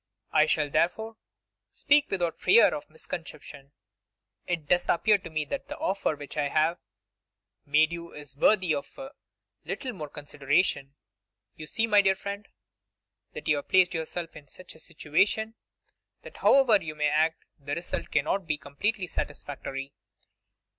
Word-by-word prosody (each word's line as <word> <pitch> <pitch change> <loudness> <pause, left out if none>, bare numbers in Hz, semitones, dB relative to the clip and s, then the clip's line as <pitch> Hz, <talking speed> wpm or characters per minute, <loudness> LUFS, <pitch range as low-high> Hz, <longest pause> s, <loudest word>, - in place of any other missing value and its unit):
I 155 0 +4
shall, 150 -1 +1
therefore, 220 +9 0 0.6
speak 290 0 +3
without 175 -4 -1
fear 185 +6 +5
of 145 - -6
misconception. 150 -3 -9 0.8
It 170 -4 -2
does 175 +3 +2
appear 210 +4 +4
to 170 - -10
me 155 -1 -2
that 280 - -5
the 295 +2 -7
offer 200 - -1
which 145 +1 -10
I 145 -1 +1
have 160 +4 +1 0.9
made 155 +3 +4
you 170 0 -7
is 145 -3 -11
worthy 185 +2 +3
of 140 -1 -5
a 270 -1 -8 0.5
little 255 -3 -4
more 150 -6 -7
consideration. 145 0 -1 0.6
You 155 - -9
see, 225 +8 0
my 210 -2 +5
dear 195 -1 +3
friend, 200 +2 -6 0.9
that - - -8
you 150 - +3
have 145 - -7
placed 185 0 +4
yourself 165 +1 -4
in 145 - -12
such 185 - -11
a 160 - -17
situation 180 +8 0 0.7
that - - -12
however 245 -7 +5
you 155 -1 -6
may 150 -1 +1
act 160 +2 +1
the 145 +1 -4
result 175 - -4
cannot 160 +5 0
be 150 - +1
one - - -16
completely 205 +6 -1
satisfactory. 135 -4 -5
165 Hz, 155 wpm, -28 LUFS, 150-195 Hz, 0.9 s, fear